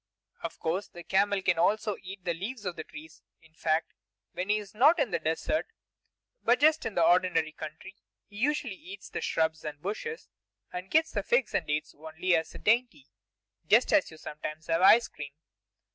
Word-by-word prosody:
Of - - -5
course, 180 +5 -2
the 175 - -11
camel 195 +2 +1
can 175 -3 +2
also 210 +4 +2
eat 190 0 -10
the 170 - +1
leaves 210 +6 -6
of 180 -2 -3
the 160 - -6
trees; 155 0 -12 0.2
in 165 -1 -23
fact, 160 0 0 0.4
when 180 +3 -4
he 210 - +4
is 205 -1 -8
not 285 +11 +5
in 270 -9 0
the 170 - 0
desert, 160 - -1 0.7
but 240 +2 +3
just 310 -1 +4
in 220 - -7
the 170 - +4
ordinary 175 -3 +3
country, 155 +5 -9 0.3
he 205 - -15
usually 290 -1 0
eats 195 +1 -11
from - - -4
the - - -7
shrubs 160 -1 0
and 150 -1 -6
bushes, 215 - -5 0.5
and 180 +1 -6
gets 320 +5 +2
figs 240 +4 +1
and 165 - 0
dates 150 0 -2
only 160 +4 -1
as 160 0 -2
a - - -6
dainty, 245 +5 +1 0.6
just - - +4
as 310 - +4
you 160 - -13
sometimes 155 +1 -7
have 165 +1 +1
ice 230 +5 +7
cream. 145 -2 -9
185 Hz, 190 wpm, -29 LUFS, 160-220 Hz, 0.7 s, ice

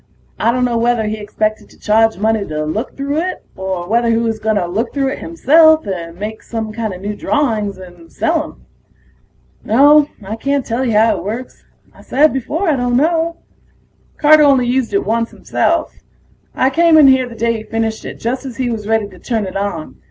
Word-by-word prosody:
I 230 - +2
dunno 245 -1 0
whether 235 -1 +1
he 215 0 -3
expected 215 +1 -3
to - - -21
charge 225 0 +2
money 220 +1 +1
to 155 0 -3
look 215 +11 -4
through 280 +2 -2
it, 370 +2 -4
or 190 -2 -4
whether 235 +3 +1
he 225 - +2
was 225 -1 -1
gonna 215 -4 0
look 210 +7 -2
through 275 -1 +1
it - - -5
himself 315 -1 +4
and 170 -4 -5
make 215 +3 -6
some 220 -2 -5
new - - -12
kinda 210 -2 -4
drawings 220 -8 -1
and 175 -3 -14
sell 325 -1 0
'em. 315 - -13 1.0
No, 290 +6 +5 0.2
I 210 +3 -5
can't 275 +2 -1
tell 235 +3 -2
you 240 -4 0
how 220 +2 +3
it - - -7
works 230 +6 -6 0.3
I - - -17
said 295 +4 +2
before 290 +9 -2
I 310 - +3
don't 245 -1 0
know. 330 +3 0 0.7
Carter 310 0 +6
only 275 -4 +4
used 250 0 0
it 395 0 0
once 230 +1 0
himself. - - -1 0.6
I 260 +1 +2
came 330 +2 +4
in 300 -3 +7
here 260 -2 +3
the 230 - -10
day 230 0 0
he 215 - -8
finished 225 0 -3
it, - - -7
just 250 +3 -3
as 260 -4 -8
he 255 -2 -1
was 215 -2 -5
ready 220 -2 +1
to 185 -3 -16
turn 225 0 -2
it 185 - -7
on. 195 -6 -4
230 Hz, 205 wpm, -16 LUFS, 210-275 Hz, 1.0 s, in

